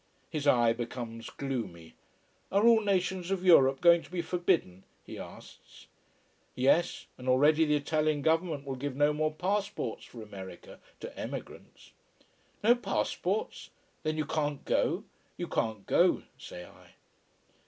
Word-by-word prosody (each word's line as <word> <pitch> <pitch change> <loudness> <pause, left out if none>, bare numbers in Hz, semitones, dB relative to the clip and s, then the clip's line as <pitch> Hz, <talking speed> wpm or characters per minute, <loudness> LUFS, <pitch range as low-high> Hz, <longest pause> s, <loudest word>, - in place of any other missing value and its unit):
His 150 -3 -2
eye 120 -4 +5
becomes 115 -1 -6
gloomy. 105 -12 -5 0.6
Are 200 +3 +3
all 230 -1 +6
nations 190 -3 0
of 190 -1 -1
Europe 135 -6 +6
going 170 -1 +6
to - - -15
be 175 -1 -3
forbidden? 170 - 0 0.2
he - - -8
asks. - - -12 0.7
Yes 140 +7 +2
and 125 0 -4
already 150 +5 +5
the 150 -1 +2
Italian 150 0 0
Government 160 -3 +1
will 135 - -3
give 140 0 -4
no 145 +2 +3
more 155 +1 0
passports 195 - -2
for 115 -2 -10
America 95 -4 -10 0.2
to - - -8
emigrants. - - -8 0.7
No 230 +3 +7
passports? 440 - -2 0.3
then 155 0 -2
you 155 - 0
can't 145 -1 -2
go? - - +1 0.3
You - - -4
can't 110 -3 -2
go, - - +3
say 90 0 -9
I. - - -18
150 Hz, 140 wpm, -30 LUFS, 125-175 Hz, 0.7 s, No